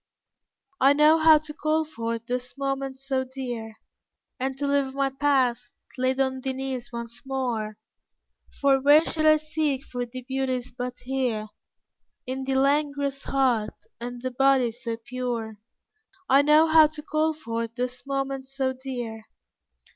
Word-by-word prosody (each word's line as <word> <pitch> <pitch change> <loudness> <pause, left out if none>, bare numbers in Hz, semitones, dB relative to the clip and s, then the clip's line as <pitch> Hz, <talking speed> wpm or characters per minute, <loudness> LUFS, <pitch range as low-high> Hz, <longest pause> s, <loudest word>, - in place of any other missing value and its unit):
I 275 +2 +6
know 305 +2 +5
how 315 0 +7
to 305 0 -7
call 310 +1 0
forth 230 -6 -4
those 250 +2 -4
moments 270 -1 -3
so 260 -1 +1
dear, 245 -4 -6 0.6
And 265 +1 -2
to 285 - -2
live 280 -1 +1
my 275 -1 +1
Past 265 -5 +1 0.2
laid 260 +1 0
on 265 -1 0
thy 265 0 -2
knees 260 -2 -5
once 235 -1 -7
more, 245 -6 -2 0.8
For 275 -1 +4
where 295 +4 +6
should 310 -1 +1
I 310 0 +7
seek 305 -3 -1
for 245 -1 -5
thy 255 +1 -9
beauties 260 -2 -2
but 250 0 -5
here 245 -5 -1 0.8
In 265 +1 -4
thy 270 - -1
langorous 280 0 +1
heart 250 -6 +1 0.2
and 245 +1 -6
thy 255 +1 -3
body 265 -1 +3
so 230 -1 -5
pure? 230 -2 -4 0.7
I 275 +2 +6
know 300 +2 +6
how 315 -1 +7
to 300 0 -10
call 310 +1 +1
forth 230 -6 -4
those 250 0 -3
moments 270 -1 -3
so 260 -1 +1
dear. 245 -4 -6
265 Hz, 150 wpm, -26 LUFS, 245-280 Hz, 0.8 s, how